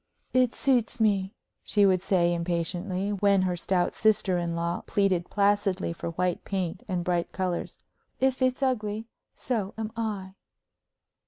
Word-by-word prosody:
"It 255 -2 +3
suits 245 -3 +1
me," 200 -3 +2 0.3
she 205 -1 +3
would 185 -2 +3
say, 175 -3 +2
impatiently, 180 +3 -2
when 200 -1 +3
her 180 -1 0
stout 175 0 0
sister 205 -4 +2
in 170 -1 -2
law 170 +1 -1
pleaded 190 -4 +1
placidly 200 -3 +1
for 170 - -5
white 180 +1 -1
paint 185 -3 -3
and 180 -3 -1
bright 175 -1 0
colors. 185 -2 -3 0.4
"If 265 0 +1
it's 255 +1 +1
ugly, 220 -4 -1 0.3
so 215 -6 -2
am 220 -1 -3
I." 205 -4 -3
195 Hz, 145 wpm, -27 LUFS, 180-215 Hz, 0.4 s, It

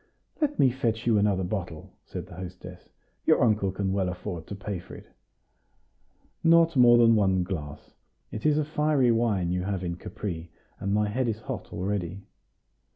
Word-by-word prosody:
"Let 295 -1 +1
me 130 - +5
fetch 115 -3 -2
you 115 -3 +4
another 100 -2 +2
bottle," 90 -4 -5
said - - -6
the - - -13
hostess; 90 0 -9 0.4
"your - - +5
uncle 105 -4 +2
can 95 0 -2
well 95 -2 0
afford 90 -2 -6
to 100 - -6
pay 95 -1 -5
for 90 - -11
it." - - -12 1.4
"Not 165 -1 +5
more 120 -2 +7
than 115 -1 +6
one 95 -3 +2
glass; 75 -6 -6 0.4
it 110 - -6
is 150 -1 +3
a 155 - +1
fiery 150 -4 +2
wine 105 -7 +1
you 90 0 0
have 95 0 -3
in 85 -1 -3
Capri, 85 -4 -6 0.3
and 100 - -2
my 105 +1 +2
head 120 +4 -1
is 110 -1 -2
hot - - -6
already." 95 0 -3
100 Hz, 175 wpm, -27 LUFS, 90-120 Hz, 1.4 s, more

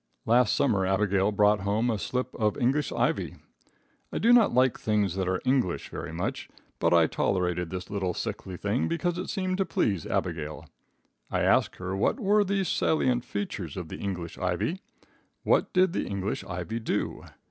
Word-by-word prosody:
Last 120 0 +4
summer 105 -9 +2
Abigail 95 +1 +2
brought 105 0 +4
home 105 +5 0
a 110 - -2
slip 125 +3 -2
of 105 -2 0
English 135 +3 +1
ivy. - - 0 0.8
I - - -3
do 235 +2 +5
not 240 -3 +6
like 130 0 +3
things 105 -4 +1
that 95 -1 -1
are 95 0 0
English 130 -9 +1
very - - -6
much, - - -4 0.3
but - - +2
I - - +6
tolerated 90 -3 0
this 90 0 -5
little 95 -3 -2
sickly 95 -2 -5
thing 105 +7 0
because 175 +1 -1
it 185 - -4
seemed 185 -2 -2
to - - +4
please 100 - 0
Abigail. 75 -4 -3 0.6
I - - 0
asked - - +3
her 95 +1 -4
what 100 - +1
were 210 -1 +3
the 200 0 0
salient 130 -8 +1
features 100 - -5
of 90 -3 -5
the - - -7
English 90 -4 -5
ivy. 90 - -1 0.6
What - - +2
did 185 -1 +3
the - - -2
English 100 0 -3
ivy 90 +6 -4
do? 110 - -2
105 Hz, 175 wpm, -27 LUFS, 95-135 Hz, 0.8 s, not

